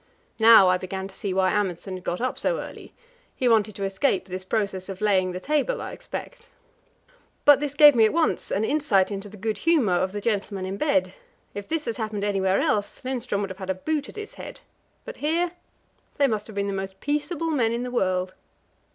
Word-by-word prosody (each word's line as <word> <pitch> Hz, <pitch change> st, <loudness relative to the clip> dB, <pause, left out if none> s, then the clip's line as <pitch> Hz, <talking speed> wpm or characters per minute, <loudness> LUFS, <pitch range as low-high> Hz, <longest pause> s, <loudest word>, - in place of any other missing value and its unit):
Now 220 Hz, -3 st, +8 dB
I 180 Hz, 0 st, +3 dB
began 190 Hz, +1 st, -5 dB
to -, -, -16 dB
see 200 Hz, -, -4 dB
why 185 Hz, 0 st, +2 dB
Amundsen 190 Hz, -2 st, -2 dB
had 185 Hz, -1 st, -7 dB
got 175 Hz, -, -2 dB
up 255 Hz, +1 st, -1 dB
so -, -, 0 dB
early; -, -, -9 dB, 0.4 s
he 255 Hz, -, 0 dB
wanted 215 Hz, -3 st, +3 dB
to 200 Hz, -, -5 dB
escape 195 Hz, +2 st, 0 dB
this 185 Hz, 0 st, -6 dB
process 195 Hz, -1 st, -2 dB
of 190 Hz, -1 st, -6 dB
laying 190 Hz, -3 st, +2 dB
the 180 Hz, -, -5 dB
table, 300 Hz, -, 0 dB
I -, -, -6 dB
expect. 485 Hz, -1 st, -8 dB, 1.0 s
But 290 Hz, -2 st, +8 dB
this 290 Hz, -1 st, -3 dB
gave 295 Hz, 0 st, +9 dB
me 230 Hz, -3 st, +5 dB
at 215 Hz, -, +2 dB
once 330 Hz, 0 st, 0 dB
an 200 Hz, -, 0 dB
insight 220 Hz, -8 st, +2 dB
into 200 Hz, +1 st, -5 dB
the 210 Hz, -, -12 dB
good 215 Hz, +2 st, -3 dB
humour 305 Hz, -, +3 dB
of 185 Hz, +1 st, +1 dB
the 205 Hz, -, -4 dB
gentlemen 200 Hz, -3 st, -2 dB
in 190 Hz, +1 st, -4 dB
bed: 285 Hz, +2 st, +1 dB, 0.4 s
if 205 Hz, 0 st, -6 dB
this 320 Hz, -1 st, -2 dB
had 230 Hz, -, -3 dB
happened 215 Hz, -3 st, -3 dB
anywhere 195 Hz, -2 st, +1 dB
else, 205 Hz, -1 st, -1 dB
Lindström 250 Hz, -5 st, -2 dB
would 195 Hz, -, -3 dB
have 185 Hz, -, -10 dB
had 190 Hz, -1 st, -7 dB
a 190 Hz, -, +1 dB
boot 295 Hz, +9 st, -2 dB
at -, -, -12 dB
his 425 Hz, 0 st, -7 dB
head. -, -, -10 dB, 0.4 s
But -, -, -8 dB
here 335 Hz, +4 st, 0 dB, 0.7 s
they 285 Hz, -, +4 dB
must 215 Hz, -5 st, -1 dB
have 215 Hz, -, -11 dB
been 200 Hz, 0 st, -1 dB
the 200 Hz, -, -2 dB
most 195 Hz, 0 st, -5 dB
peaceable 300 Hz, +3 st, -2 dB
men 240 Hz, -7 st, +1 dB
in 235 Hz, +1 st, -2 dB
the 250 Hz, -, -5 dB
world. 185 Hz, -5 st, 0 dB
210 Hz, 220 wpm, -25 LUFS, 190-285 Hz, 1.0 s, gave